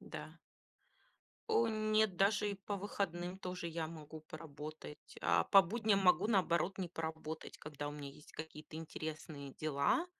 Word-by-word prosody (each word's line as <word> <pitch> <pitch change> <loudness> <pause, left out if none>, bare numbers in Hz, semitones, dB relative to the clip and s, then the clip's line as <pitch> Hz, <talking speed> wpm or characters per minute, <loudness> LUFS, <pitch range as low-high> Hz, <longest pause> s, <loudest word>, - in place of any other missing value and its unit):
да. - - -8 1.1
О 235 - +4
нет, 215 -3 +3
даже 205 +2 +3
и 200 - -2
по 200 +1 -4
выходным 190 -4 -2
тоже 180 -2 -4
я 165 -1 -2
могу 155 -1 -8
поработать, 155 -1 -9
А - - +4
по 195 -1 +8
будням 215 +2 +2
могу, 190 +1 +5
наоборот, 190 -3 +3
не 185 -2 -2
поработать, 160 -1 -5
когда 145 -1 -5
у - - -3
меня 145 -1 -6
есть 145 - -15
какие-то 155 0 -7
интересные 155 -3 -5
дела. 155 - +2
170 Hz, 145 wpm, -37 LUFS, 155-200 Hz, 1.1 s, по